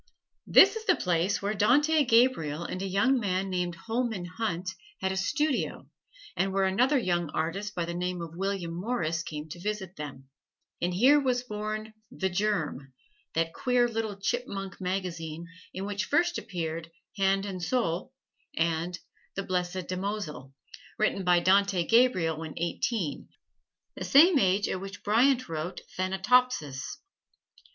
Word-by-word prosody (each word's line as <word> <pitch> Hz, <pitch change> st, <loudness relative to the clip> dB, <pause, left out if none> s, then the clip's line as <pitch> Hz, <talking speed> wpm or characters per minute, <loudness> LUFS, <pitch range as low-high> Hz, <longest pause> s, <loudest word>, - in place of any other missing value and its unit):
This -, -, +7 dB
is 445 Hz, 0 st, -6 dB
the 370 Hz, -, +4 dB
place 180 Hz, +3 st, 0 dB
where 205 Hz, +1 st, 0 dB
Dante 290 Hz, +9 st, +4 dB
Gabriel 230 Hz, -, +3 dB
and 185 Hz, +2 st, -5 dB
a 195 Hz, -, -2 dB
young 205 Hz, +8 st, +3 dB
man 190 Hz, -2 st, -1 dB
named 180 Hz, -1 st, -1 dB
Holman 225 Hz, 0 st, -2 dB
Hunt 185 Hz, -1 st, -3 dB, 0.3 s
had 190 Hz, -, 0 dB
a -, -, -2 dB
studio, 295 Hz, +8 st, -1 dB, 0.4 s
and 190 Hz, +2 st, 0 dB
where 195 Hz, 0 st, +1 dB
another 245 Hz, +10 st, +3 dB
young 175 Hz, -, 0 dB
artist 195 Hz, +6 st, -2 dB
by 175 Hz, -, -1 dB
the 170 Hz, -, -4 dB
name 180 Hz, +1 st, -2 dB
of 165 Hz, -1 st, -7 dB
William 190 Hz, -2 st, -2 dB
Morris 175 Hz, -4 st, -1 dB
came 150 Hz, -2 st, -6 dB
to 175 Hz, -, -8 dB
visit 200 Hz, -2 st, -4 dB
them; 140 Hz, -3 st, -8 dB, 0.5 s
and 175 Hz, -, +1 dB
here 265 Hz, +9 st, +6 dB
was 250 Hz, -3 st, 0 dB
born 215 Hz, -1 st, -5 dB, 0.2 s
"The 190 Hz, -1 st, -2 dB
Germ," 175 Hz, -9 st, -1 dB, 0.4 s
that 165 Hz, 0 st, 0 dB
queer 250 Hz, -1 st, +2 dB
little 220 Hz, -3 st, -3 dB
chipmunk 200 Hz, -4 st, -3 dB
magazine 170 Hz, -3 st, -3 dB, 0.3 s
in 190 Hz, +1 st, -5 dB
which 205 Hz, 0 st, -2 dB
first 345 Hz, +3 st, +2 dB
appeared 165 Hz, -4 st, -4 dB, 0.3 s
"Hand 195 Hz, 0 st, +2 dB
and 190 Hz, -3 st, -5 dB
Soul" 195 Hz, 0 st, -1 dB, 0.5 s
and 165 Hz, +2 st, 0 dB, 0.4 s
"The 195 Hz, -, -2 dB
Blessed 180 Hz, -1 st, -2 dB
Damozel," 185 Hz, -7 st, -4 dB, 0.5 s
written 210 Hz, -2 st, +1 dB
by 175 Hz, -1 st, +4 dB
Dante 195 Hz, -1 st, +3 dB
Gabriel 185 Hz, -10 st, +3 dB
when 160 Hz, -1 st, -7 dB
eighteen, 170 Hz, +1 st, -2 dB, 0.7 s
the -, -, -5 dB
same 310 Hz, +3 st, +6 dB
age 195 Hz, -1 st, +2 dB
at 185 Hz, -, -3 dB
which 195 Hz, +1 st, -8 dB
Bryant 250 Hz, +5 st, +3 dB
wrote 165 Hz, +2 st, -4 dB, 0.2 s
"Thanatopsis." 190 Hz, -, +1 dB
190 Hz, 145 wpm, -28 LUFS, 175-225 Hz, 0.7 s, This